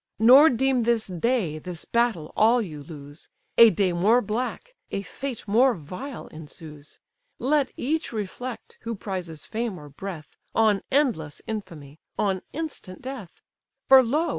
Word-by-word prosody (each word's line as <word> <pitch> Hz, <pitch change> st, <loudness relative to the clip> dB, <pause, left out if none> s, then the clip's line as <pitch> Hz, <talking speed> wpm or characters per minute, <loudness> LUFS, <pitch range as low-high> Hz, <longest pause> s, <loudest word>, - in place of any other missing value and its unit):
Nor 260 Hz, +8 st, +8 dB
deem 260 Hz, +1 st, +1 dB
this 230 Hz, -1 st, +1 dB
day, 185 Hz, -3 st, -1 dB
this 175 Hz, +1 st, -7 dB
battle, 235 Hz, -10 st, 0 dB
all 230 Hz, +3 st, +5 dB
you 160 Hz, -10 st, -5 dB
lose; 145 Hz, 0 st, -11 dB, 0.3 s
A 230 Hz, -1 st, +10 dB
day 195 Hz, -4 st, +1 dB
more 205 Hz, +8 st, +4 dB
black, 250 Hz, -, -4 dB, 0.2 s
a 195 Hz, -, -3 dB
fate 260 Hz, 0 st, -6 dB
more 240 Hz, +4 st, +4 dB
vile, 185 Hz, -, -8 dB
ensues. 150 Hz, -1 st, -12 dB, 0.4 s
Let 280 Hz, 0 st, +1 dB
each 310 Hz, +5 st, -1 dB
reflect, 230 Hz, +3 st, -6 dB
who 230 Hz, 0 st, -4 dB
prizes 180 Hz, -6 st, -6 dB
fame 225 Hz, -5 st, -3 dB
or 150 Hz, -1 st, -11 dB
breath, 155 Hz, -1 st, -8 dB, 0.2 s
On 215 Hz, -3 st, +3 dB
endless 235 Hz, -, +1 dB
infamy, 160 Hz, -9 st, -7 dB, 0.2 s
on 190 Hz, -3 st, 0 dB
instant 285 Hz, -, -6 dB
death: 255 Hz, -9 st, -8 dB, 0.4 s
For, 265 Hz, 0 st, +9 dB
lo! 295 Hz, +8 st, 0 dB
215 Hz, 140 wpm, -25 LUFS, 170-250 Hz, 0.4 s, A